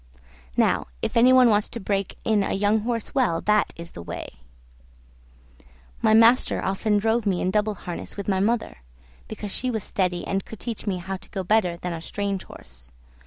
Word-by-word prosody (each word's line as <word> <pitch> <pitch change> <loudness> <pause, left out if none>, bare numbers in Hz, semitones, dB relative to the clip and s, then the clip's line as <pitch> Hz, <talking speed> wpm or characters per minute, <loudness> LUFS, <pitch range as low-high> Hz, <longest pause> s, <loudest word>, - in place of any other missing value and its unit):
Now - - +2 0.2
if - - -2
any 240 +2 +6
one 255 -1 +7
wants 210 -1 +2
to 235 - -6
break 195 -2 -2
in 215 -2 +3
a - - -1
young 205 +2 +2
horse 230 0 -3
well, 245 - +2
that 210 0 +2
is 170 0 -9
the - - -9
way. 70 -7 -7 1.6
My 220 - +5
master 230 +3 +5
often 205 +2 +1
drove 220 +1 +1
me 185 -3 +1
in 185 - 0
double 210 +1 +1
harness 175 +1 -7
with 200 - -5
my 190 -2 +1
mother, 225 - 0 0.5
because 205 - -6
she 255 - -1
was 220 -5 -2
steady 180 -2 -1
and 195 0 -1
could 225 - -11
teach 230 -2 -6
me 190 -2 0
how 190 +2 -5
to - - -15
go 190 - -4
better 180 -3 +2
than 180 0 -4
a 165 - -6
strange 200 +1 -3
horse. 60 0 -11
205 Hz, 195 wpm, -24 LUFS, 185-220 Hz, 1.6 s, one